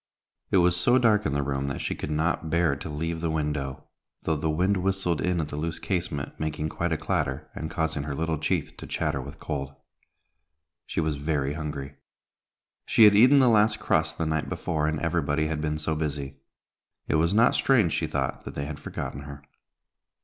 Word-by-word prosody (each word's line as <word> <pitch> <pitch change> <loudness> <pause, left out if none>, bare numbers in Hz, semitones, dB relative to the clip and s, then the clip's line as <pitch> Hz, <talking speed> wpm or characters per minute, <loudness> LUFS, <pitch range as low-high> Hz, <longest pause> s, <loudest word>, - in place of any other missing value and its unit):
It - - +3
was 90 -1 +4
so 120 +8 +4
dark 110 -4 +3
in 70 - -1
the 70 - +1
room 70 0 -2
that 70 - -3
she - - -2
could - - -5
not 80 +1 0
bear 85 -3 +2
to 70 +3 -7
leave 80 +2 -3
the 85 - 0
window, 75 -4 -2 0.4
though 80 - +1
the 80 +1 -1
wind 90 +6 +2
whistled 95 -3 0
in 90 -1 +1
at 75 -2 -2
the - - -5
loose 80 +2 -3
casement, 85 -6 -3
making 80 0 -2
quite 85 +2 -2
a 80 - +1
clatter, 80 - -2
and 80 - -5
causing 80 -2 -1
her 70 -1 -3
little 80 0 -1
teeth 80 - -1
to - - -9
chatter 70 - -1
with 70 +2 -10
cold. 70 -1 -4 1.1
She - - -2
was 80 -2 0
very 70 -1 -1
hungry. 75 -3 -5 0.9
She 115 - +5
had 105 -1 +8
eaten 125 +7 +7
the 130 -2 +6
last 110 -1 +4
crust 80 -5 +1
the 80 - -1
night 80 -1 -1
before, 75 -2 -1
and 80 0 -1
everybody 80 -2 0
had 80 -1 -2
been 75 0 -1
so 75 +1 -1
busy. 70 -3 -3 0.7
It - - +2
was 85 +2 +2
not 115 +4 +5
strange, 115 - +3
she - - 0
thought, - - -2
that - - -7
they 70 - -3
had 75 0 -6
forgotten 70 - -5
her. 70 -1 -10
80 Hz, 200 wpm, -27 LUFS, 75-85 Hz, 1.1 s, had